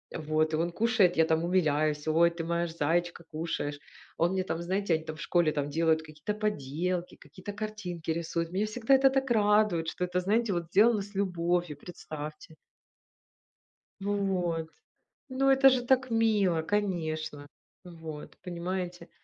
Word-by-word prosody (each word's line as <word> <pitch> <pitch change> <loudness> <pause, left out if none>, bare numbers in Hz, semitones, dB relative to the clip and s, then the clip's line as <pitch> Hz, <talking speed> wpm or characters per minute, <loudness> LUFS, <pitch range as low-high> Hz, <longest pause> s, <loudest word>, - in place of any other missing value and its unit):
Вот, 155 0 0
и - - +2
он 170 +1 0
кушает, 210 -4 +2
я 160 - +5
там 160 +1 +1
умиляюсь: 155 -4 +1
"Ой, 165 +2 +4
ты 170 -1 -6
моя 170 +1 -1
ж 165 - -10
заечка, 170 +3 0
кушаешь". 155 -2 -3 0.4
Он 175 +3 +2
мне 190 -1 0
там, 170 -2 -3
знаете, 190 0 0
они 160 0 0
там 155 -1 -6
в 150 - -10
школе 170 -3 +2
там 145 -1 -2
делают 160 0 +2
какие-то 155 +7 -5
поделки, 180 -2 -2
какие-то 180 +8 -10
картинки 200 -6 -5
рисуют. 165 0 -2
Меня 205 +3 0
всегда 235 +4 +1
это 270 0 +6
так 265 -2 0
радует, 210 -6 +3
что 180 +3 -2
это, 180 0 -1
знаете, 210 +2 +1
вот 170 -1 -2
сделано 210 +4 +4
с 200 0 -10
любовью, 175 -4 0
представьте. 155 -2 -8 1.5
Вот. 185 -5 -1 0.6
Ну 270 +1 +1
это 270 0 +7
же 255 -2 +1
так 255 -1 +2
мило, 210 -7 +2
конечно, 160 -6 -2 0.4
вот, 160 -3 -9
понимаете, 180 0 -4
175 Hz, 155 wpm, -29 LUFS, 160-205 Hz, 1.5 s, это